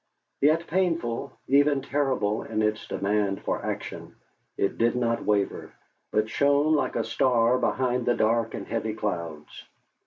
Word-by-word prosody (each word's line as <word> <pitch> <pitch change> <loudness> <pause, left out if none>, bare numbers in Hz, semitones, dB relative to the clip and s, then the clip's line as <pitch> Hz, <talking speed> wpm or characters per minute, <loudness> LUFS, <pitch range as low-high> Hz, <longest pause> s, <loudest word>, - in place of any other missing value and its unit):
Yet 155 +4 +3
painful, 165 -8 -1
even 140 0 +3
terrible 130 -8 0
in 110 -1 -2
its 110 0 -1
demand 100 -1 -1
for - - -2
action, - - -5 0.4
it 100 - -1
did 115 +1 +2
not 115 -1 0
waver, 100 -2 -1 0.4
but 105 0 +1
shone 145 +5 +2
like 150 - 0
a - - +1
star 125 -1 +2
behind 125 -2 0
the 120 - +3
dark 115 +1 +1
and - - -6
heavy 110 -1 -3
clouds. 85 -8 -5
115 Hz, 145 wpm, -26 LUFS, 105-140 Hz, 0.4 s, Yet